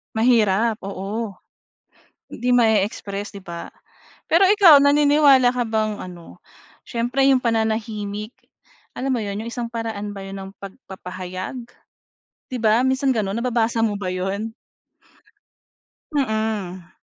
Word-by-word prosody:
Mahirap, 225 -1 +3
oo. 200 +3 -4 1.0
Hindi 250 +1 -2
ma-e-express, 210 -3 +1
'di 200 - -9
ba? 170 -3 -8 0.6
Pero 335 +4 +4
ikaw, 370 -8 +7
naniniwala 285 -2 +5
ka 245 - +1
bang 220 -2 -1
ano, 175 - -11 0.4
siyempre 240 +3 -1
'yong 270 -1 +5
pananahimik 220 -2 -2 0.6
alam 270 - -4
mo 230 - -2
'yon, 200 0 -4
'yong 230 - -6
isang 235 0 -5
paraan 225 -3 -4
ba 200 - -8
'yon 195 - -7
ng 190 - -9
pagpapahayag, 185 -1 -7 1.0
'di 255 - -2
ba, 225 +2 +3
minsan 265 +1 +1
gano'n 210 0 -1
nababasa 235 -1 0
mo 220 -2 +1
ba 185 -2 -3
'yon? 195 +4 -3 1.6
Mm. 215 -9 -2
220 Hz, 120 wpm, -22 LUFS, 200-245 Hz, 1.6 s, ikaw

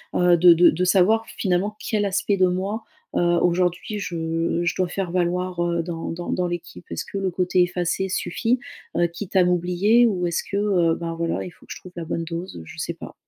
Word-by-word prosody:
heu, 180 -1 +5
de 175 +1 +8
de 175 +1 +6
de 175 +3 -1
savoir, 205 +5 +4
finalement, 195 +2 0
quel 210 0 -1
aspect 200 +1 0
de 185 -1 +4
moi, 195 +5 -2 0.3
heu, - - +2 0.2
aujourd'hui, 180 +4 0
je 165 -2 -1
je 170 -2 0
dois 185 - +1
faire 185 -1 -3
valoir, 180 0 0
heu, 170 -1 0
dans 165 -1 -5
dans 175 +1 -5
dans 180 -1 0
l'équipe. 175 - -6
Est-ce 85 - -3
que - - -6
le 195 -1 0
côté 180 +1 +1
effacé 180 +2 -1
suffit, 225 +7 0 0.4
heu, 175 - +4
quitte 175 +4 -8
à 185 - +6
m'oublier 180 +7 +3
ou 185 -5 -1
est-ce 170 - -1
que, 200 - -1
heu, 180 -5 +2
ben, 165 -1 -3
voilà, 165 0 -2
il 180 - -8
faut - - -21
que - - -11
je - - -11
trouve 180 - -13
la 170 - -5
bonne 165 +1 -2
dose? 170 +3 -6
Heu, 80 - -8
je - - -12
sais - - -2
pas. - - -10
180 Hz, 225 wpm, -23 LUFS, 170-190 Hz, 0.4 s, de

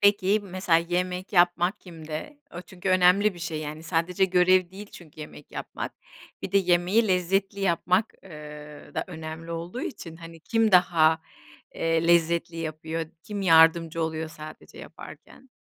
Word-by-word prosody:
Peki, 205 0 +3
mesela 185 -3 +1
yemek 180 +3 -3
yapmak 175 +1 +2
kimde? 160 - -8 0.2
O 175 - -5
çünkü 185 +1 -7
önemli 185 +2 +4
bir - - -12
şey, 165 -2 -4
yani, 155 +1 -7
sadece 170 +3 0
görev 185 -1 +3
değil 200 +2 -10
çünkü 155 -3 -13
yemek 150 -1 -11
yapmak. - - -6 0.5
Bir 185 - -5
de 200 - +5
yemeği 185 +4 +2
lezzetli 195 +2 0
yapmak, 185 +2 +1
eee, 150 -3 -11
da - - -2
önemli 160 -1 -8
olduğu 170 +8 -5
için, 165 -9 -7
hani, 165 -1 -12
kim 225 +3 +1
daha, 165 -3 +4 0.5
eee, 165 0 0
lezzetli 170 0 +2
yapıyor, 160 0 -4 0.2
kim 205 0 -5
yardımcı 165 -1 +4
oluyor 160 0 -3
sadece 155 -1 -12
yaparken? 265 - -13
175 Hz, 145 wpm, -26 LUFS, 160-185 Hz, 0.5 s, de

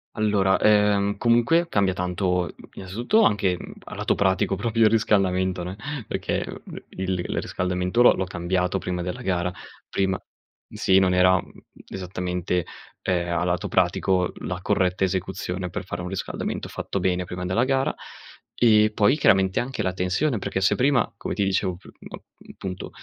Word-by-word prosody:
Allora, 100 -3 +2
ehm, 105 -1 +3
comunque 120 +10 +3
cambia 100 -2 +2
tanto, 90 -1 -1 0.2
innanzitutto 120 - 0
anche, 100 - +2
mhmm, - - -9
a - - -9
lato - - 0
pratico 95 0 +1
proprio 115 +2 +1
il - - +6
riscaldamento, 95 -4 +1
ne, 90 +2 -5 0.3
perché, - - -2 0.2
uhm, - - -10
il 95 0 -3
l - - -4
riscaldamento 90 +4 -1
l'ho 120 - +7
l'ho 95 - -2
cambiato 90 +1 -1
prima 90 -1 -3
della 90 0 -5
gara, 90 -1 -1 0.4
prima 95 -1 0
mhmm, - - -23
sì, 95 0 +3
non 95 -1 +4
era, 90 0 +5
mhmm, 90 - -3 0.4
esattamente, 90 -1 -3 0.4
ehm, 90 -2 0
a 85 - 0
lato 90 -1 -1
pratico, 90 -2 +1
la 90 -1 -4
corretta 95 0 +1
esecuzione 95 -1 -2
per - - -5
fare 90 -2 -5
un 90 - -5
riscaldamento 95 0 -4
fatto - - -4
bene 90 -1 0
prima 90 0 -5
della 95 +7 +1
gara, 135 0 +1 0.7
e 110 -2 +5
poi 105 +6 +3
chiaramente 95 -1 +3
anche 125 -3 -3
la 95 -1 -1
tensione, 95 +8 0
perché 95 - -3
se 95 - +3
prima, 135 -1 +2
come - - -5
ti 100 - 0
dicevo, 95 -1 0
piu 90 - -15
mhmm, - - -13
punto, 95 -1 -6
95 Hz, 165 wpm, -24 LUFS, 90-105 Hz, 0.7 s, l'ho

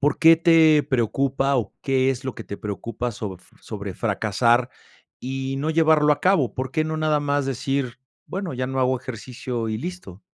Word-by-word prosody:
¿Por 145 0 +1
qué 165 0 +7
te 160 -2 +5
preocupa 135 +1 0
o 110 -5 -2
qué 135 -1 +2
es 130 -1 -4
lo 130 - -4
que 115 - -8
te 100 - -7
preocupa 115 +3 -4
sobr 95 -4 -6 0.2
sobre 100 -3 -6
fracasar 115 +4 +1 0.5
y 135 +1 -3
no 155 +3 -1
llevarlo 155 -2 +4
a - - -3
cabo? 160 - +2
¿Por 130 0 -3
qué 155 -2 +1
no 155 0 -3
nada 155 -1 +1
más 145 -1 0
decir, 135 -1 -2 0.3
bueno, 190 -4 -4
ya 130 +1 -2
no 130 0 -2
hago 130 0 +2
ejercicio 120 -1 -5
y 110 0 -2
listo? 135 - -7
130 Hz, 185 wpm, -23 LUFS, 115-150 Hz, 0.5 s, qué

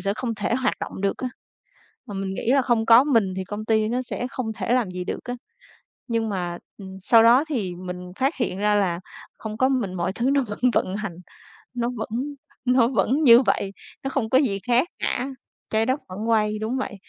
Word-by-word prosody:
sẽ 200 0 -1
không 230 0 -3
thể 210 +2 -1
hoạt 260 +1 +1
động - - -5
được 200 0 0
á." 255 - -2 0.8
Mà 205 - -8
mình 195 0 -3
nghĩ 230 - -1
là 275 0 +5
không 240 -3 +1
có 230 +3 +8
mình 225 -10 +2
thì 190 - -3
công 205 +3 -6
ty 220 -1 +2
nó 245 +3 0
sẽ 250 0 -4
không 230 -4 -4
thể 235 - -1
làm 245 -6 +2
gì 180 0 -4
được - - -4
á. 245 - -4 0.7
Nhưng 230 -2 0
mà, 175 -3 -3 0.2
ừm, 190 -2 -9
sau 225 +4 +6
đó 240 +5 +6
thì 200 - -2
mình 180 0 -7
phát 270 +4 0
hiện 190 -8 -2
ra 210 +1 +2
là 180 -4 +1 0.4
hông 215 -1 -6
có 260 +3 +3
mình 240 -9 0
mọi 175 0 -1
thứ 240 +5 0
nó 275 -1 +3
vẫn 210 -3 -7
vận 190 -1 0
hành, 205 -5 -4 0.6
nó 240 -1 -1
vẫn 220 - -4 0.6
nó 250 -2 +4
vẫn 255 +5 +1
như 240 -3 +8
vậy, 200 -5 0 0.3
nó 270 - -1
không 245 -5 -1
có 260 - +5
gì 220 -9 +1
khác 245 +6 +3
cả. 255 - -1 0.4
Trái 220 +1 +2
Đất 260 +3 0
vẫn 210 +5 -5
quay 215 -2 +2
đúng 220 +4 -2
vậy, 260 -5 -3
225 Hz, 220 wpm, -24 LUFS, 195-250 Hz, 0.8 s, có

